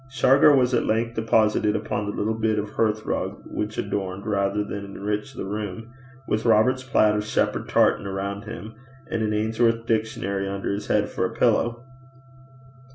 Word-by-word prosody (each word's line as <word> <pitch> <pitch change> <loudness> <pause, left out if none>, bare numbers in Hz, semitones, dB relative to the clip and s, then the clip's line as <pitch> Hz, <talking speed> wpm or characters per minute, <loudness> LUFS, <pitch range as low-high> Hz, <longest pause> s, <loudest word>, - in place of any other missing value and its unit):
Shargar 135 +2 +5
was 125 -1 +2
at 120 - +1
length 115 +1 0
deposited 110 -1 +2
upon 105 -1 -2
the - - -1
little 110 +2 0
bit 110 -1 0
of 105 0 -3
hearthrug 110 -1 -1
which 105 +1 -4
adorned 95 -1 -3
rather 100 -1 0
than 100 0 -5
enriched 105 +6 -4
the - - -4
room, 105 +3 -5 0.3
with 110 +1 0
Robert's 115 +3 +3
plaid 110 -4 +3
of 105 - 0
shepherd 105 - -1
tartan 100 - +3
around 100 +1 -4
him, 110 -1 -8 0.4
and 115 - -1
an 110 -1 0
Ainsworth's 115 +2 +1
dictionary 100 -3 -1
under 100 0 -3
his 100 - -5
head - - +2
for - - -2
a - - -10
pillow. 120 +2 +1
110 Hz, 165 wpm, -24 LUFS, 100-115 Hz, 0.4 s, Shargar